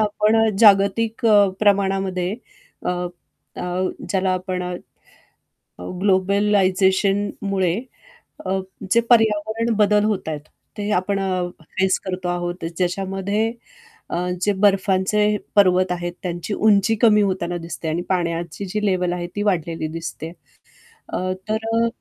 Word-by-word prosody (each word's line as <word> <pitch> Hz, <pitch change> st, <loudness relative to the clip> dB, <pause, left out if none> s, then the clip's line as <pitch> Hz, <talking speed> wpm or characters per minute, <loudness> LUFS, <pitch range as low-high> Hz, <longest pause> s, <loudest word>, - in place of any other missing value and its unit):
आपण 210 Hz, +1 st, +2 dB
अ, -, -, +2 dB
जागतिक 215 Hz, +3 st, +4 dB
अ, 205 Hz, -2 st, +6 dB
प्रमाणामध्ये 195 Hz, -2 st, +1 dB, 0.5 s
अ, -, -, +2 dB, 0.7 s
अ, -, -, -5 dB, 0.5 s
ज्याला 190 Hz, -1 st, +1 dB
आपण 185 Hz, 0 st, -3 dB
अ, 180 Hz, 0 st, -4 dB, 1.3 s
ग्लोबलायझेशनमुळे 195 Hz, -1 st, +2 dB, 0.7 s
अ, 190 Hz, +1 st, 0 dB, 0.3 s
जे 235 Hz, -, +5 dB
पर्यावरण 225 Hz, 0 st, +3 dB
बदल 210 Hz, 0 st, +3 dB
होत 205 Hz, -6 st, -1 dB
आहेत, 150 Hz, -2 st, -3 dB, 0.4 s
ते 205 Hz, 0 st, -2 dB
आपण 195 Hz, +1 st, 0 dB
अ, 185 Hz, -2 st, -1 dB, 0.3 s
फेस 190 Hz, 0 st, +3 dB
करतो 185 Hz, -1 st, -4 dB
आहोत. 175 Hz, 0 st, -3 dB
ज्याच्यामध्ये 195 Hz, +4 st, -1 dB, 0.6 s
अ, -, -, -2 dB, 0.3 s
जे 205 Hz, -, +3 dB
बर्फाचे 200 Hz, +1 st, +2 dB, 0.2 s
पर्वत 185 Hz, -2 st, +4 dB
आहेत 175 Hz, 0 st, -3 dB
त्यांची 175 Hz, +2 st, -3 dB
उंची 215 Hz, +1 st, +3 dB
कमी 210 Hz, -3 st, +6 dB
होताना 185 Hz, -3 st, -1 dB
दिसते 165 Hz, -1 st, -6 dB
आणि 165 Hz, +3 st, -1 dB
पाण्याची 170 Hz, 0 st, -2 dB
जी 210 Hz, +3 st, -3 dB
लेव्हल 180 Hz, -2 st, +1 dB
आहे, 175 Hz, -1 st, -3 dB
ती 205 Hz, -, -1 dB
वाढलेली 165 Hz, -5 st, -1 dB
दिसते. 165 Hz, 0 st, -6 dB, 0.8 s
अ, -, -, -3 dB, 0.3 s
तर 220 Hz, +1 st, -2 dB
अ, 230 Hz, 0 st, +3 dB
195 Hz, 125 wpm, -21 LUFS, 180-210 Hz, 1.3 s, अ